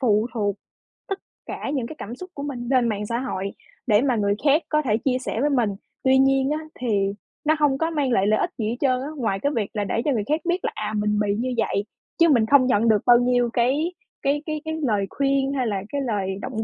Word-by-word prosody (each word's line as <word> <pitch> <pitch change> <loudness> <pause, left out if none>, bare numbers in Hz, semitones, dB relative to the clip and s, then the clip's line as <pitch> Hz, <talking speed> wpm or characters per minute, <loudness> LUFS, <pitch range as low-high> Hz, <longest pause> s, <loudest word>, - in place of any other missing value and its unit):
phụ 220 -3 +3
thuộc 205 -3 0 0.5
tất 390 - -2 0.3
cả - - -5
những 250 -4 -1
cái 315 - -8
cảm 235 -1 -7
xúc 365 +5 -9
của 280 - -6
mình 245 -4 -5
lên 250 -3 +3
mạng 210 -1 -2
xã 235 +3 -2
hội 200 -7 -3 0.4
để 210 +1 +5
mà 260 -3 +2
người 200 -2 +1
khác 295 +2 +4
có 305 0 +2
thể 220 -6 +1
chia 255 -2 +2
sẻ 230 - -3
với 295 - +2
mình. 245 -6 +2 0.3
Tuy 265 0 +5
nhiên 270 0 +3
á, 305 - 0 0.2
thì 200 -5 0 0.3
nó 310 - +4
hông 285 -3 +3
có 325 +3 0
mang 290 -5 0
lại 200 -4 +3
lợi 215 0 +3
ích 350 - 0
gì 220 -2 -1
hết 235 - -2
trơn 255 -2 +2
á, 275 - -4
ngoài 220 -6 -1
cái 285 +6 0
việc 215 -4 -1
là 210 - -1
để 225 +3 -1
cho 295 - +2
người 220 -6 0
khác 305 +2 +1
biết 355 +1 0
là, - - 0
à, 215 0 -3
mình 210 0 +1
bị 205 -1 +1
như 250 +3 -2
vậy, 200 -2 0 0.3
chứ 335 -1 +6
mình 235 -6 +4
không 270 +1 +5
nhận 230 -2 +2
được 210 -2 +4
bao 240 -1 +7
nhiêu 245 -1 +2
cái 280 +9 +1 0.3
cái 290 +2 0
cái 310 -1 -3
cái 315 - -2
lời 210 -6 +1
khuyên 275 0 +1
hay 255 -4 0
là 200 -3 -1
cái 285 -1 -2
lời 205 -6 -1
động 220 -2 -3
250 Hz, 260 wpm, -23 LUFS, 215-280 Hz, 0.5 s, bao